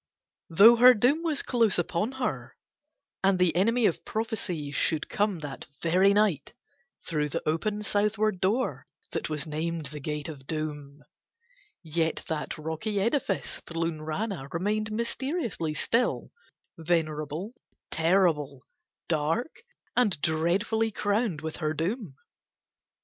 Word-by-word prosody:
Though 215 Hz, +8 st, +8 dB
her 250 Hz, +1 st, +8 dB
doom 255 Hz, +9 st, +3 dB
was 320 Hz, -4 st, 0 dB
close 230 Hz, -5 st, +2 dB
upon 175 Hz, +7 st, -1 dB
her 260 Hz, -1 st, -3 dB, 0.7 s
and 190 Hz, -1 st, +4 dB
the 180 Hz, -3 st, +2 dB
enemy 230 Hz, +6 st, +3 dB
of 175 Hz, -, +1 dB
prophecy 190 Hz, -9 st, -3 dB
should 150 Hz, +2 st, 0 dB
come 205 Hz, -2 st, +1 dB
that 145 Hz, -2 st, -7 dB
very 185 Hz, +4 st, +4 dB
night 205 Hz, -, +1 dB, 0.5 s
through 150 Hz, -3 st, -1 dB
the -, -, -4 dB
open, 205 Hz, +7 st, -1 dB
southward 210 Hz, -1 st, +1 dB
door 220 Hz, +7 st, 0 dB, 0.2 s
that -, -, -3 dB
was 150 Hz, -2 st, -2 dB
named 160 Hz, +1 st, -3 dB
the 150 Hz, -, -6 dB
Gate 150 Hz, +1 st, -4 dB
of 155 Hz, -4 st, -7 dB
the -, -, -19 dB
Doom, 150 Hz, -2 st, -5 dB, 0.8 s
yet 160 Hz, 0 st, -1 dB
that 155 Hz, -2 st, -3 dB
rocky 160 Hz, +7 st, -3 dB
edifice 220 Hz, -1 st, -1 dB
Thlunrana 165 Hz, 0 st, -3 dB
remained 210 Hz, +5 st, -1 dB
mysterious 250 Hz, -, -2 dB, 0.2 s
still, 235 Hz, +9 st, 0 dB, 0.5 s
venerable, 160 Hz, -, -1 dB, 0.4 s
terrible, 160 Hz, -6 st, +2 dB, 0.4 s
dark, 165 Hz, -, 0 dB, 0.4 s
and 210 Hz, -11 st, +2 dB
dreadfully 190 Hz, +9 st, +1 dB
crowned 205 Hz, -5 st, 0 dB
with 160 Hz, 0 st, -5 dB
her 155 Hz, -1 st, -1 dB
doom. 175 Hz, -, -2 dB
175 Hz, 120 wpm, -28 LUFS, 155-215 Hz, 0.8 s, Though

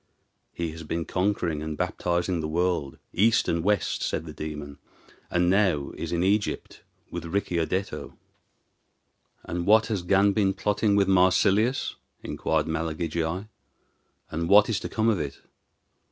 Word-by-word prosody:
"He 85 Hz, -2 st, -3 dB
has 80 Hz, +1 st, -9 dB
been 80 Hz, +1 st, -3 dB
conquering 90 Hz, -5 st, -1 dB
and 80 Hz, -1 st, -4 dB
baptizing 85 Hz, 0 st, -1 dB
the 80 Hz, -, -2 dB
world, 85 Hz, -3 st, -1 dB, 0.2 s
east 115 Hz, +4 st, +3 dB
and 85 Hz, -1 st, 0 dB
west," 100 Hz, -2 st, +1 dB
said 75 Hz, -, -2 dB
the 80 Hz, -, -8 dB
demon, 75 Hz, -2 st, -7 dB, 0.5 s
"and 90 Hz, 0 st, +2 dB
is 90 Hz, -, +3 dB
now 95 Hz, -8 st, +2 dB
in 85 Hz, 0 st, -2 dB
Egypt 100 Hz, +2 st, -1 dB, 0.3 s
with -, -, -5 dB
Ricciardetto." 90 Hz, 0 st, -2 dB, 1.3 s
"And 85 Hz, +1 st, -4 dB
what 110 Hz, +1 st, +6 dB
has 100 Hz, -, -1 dB
Gan 100 Hz, +3 st, +3 dB
been 95 Hz, -2 st, +2 dB
plotting 105 Hz, 0 st, +1 dB
with 100 Hz, -1 st, +3 dB
Marsilius?" 95 Hz, +6 st, +3 dB, 0.3 s
inquired 80 Hz, -1 st, -1 dB
Malagigi; 80 Hz, +3 st, -2 dB, 0.8 s
"and 85 Hz, +1 st, -2 dB
what 105 Hz, +2 st, +7 dB
is 115 Hz, -, 0 dB
to -, -, -5 dB
come 110 Hz, 0 st, 0 dB
of 110 Hz, -5 st, +2 dB
it?" 70 Hz, -2 st, -4 dB
90 Hz, 140 wpm, -26 LUFS, 80-100 Hz, 1.3 s, what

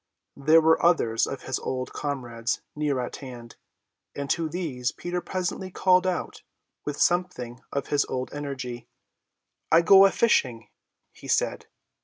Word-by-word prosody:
There 155 Hz, +4 st, +5 dB
were 160 Hz, +1 st, +3 dB
others 120 Hz, -10 st, +3 dB
of 135 Hz, -, -6 dB
his 130 Hz, -, -2 dB
old 130 Hz, -1 st, -4 dB
comrades 120 Hz, -5 st, -3 dB
near 150 Hz, -3 st, 0 dB
at 125 Hz, -, -4 dB
hand, 120 Hz, -4 st, -10 dB, 0.6 s
and 140 Hz, -1 st, -3 dB
to 165 Hz, -2 st, 0 dB
these 150 Hz, -8 st, -2 dB
Peter 175 Hz, 0 st, -4 dB
presently 185 Hz, +1 st, -3 dB
called 185 Hz, 0 st, +3 dB
out 185 Hz, -, -3 dB, 0.4 s
with 145 Hz, 0 st, -4 dB
something 175 Hz, -9 st, 0 dB
of 140 Hz, -1 st, -3 dB
his 145 Hz, -1 st, +3 dB
old 130 Hz, 0 st, -4 dB
energy: 130 Hz, -5 st, -6 dB, 0.8 s
"I 165 Hz, +1 st, +6 dB
go 195 Hz, +3 st, +8 dB
a -, -, -1 dB
fishing," 125 Hz, -, +1 dB, 0.4 s
he -, -, -13 dB
said. -, -, 0 dB
145 Hz, 145 wpm, -26 LUFS, 125-175 Hz, 0.8 s, go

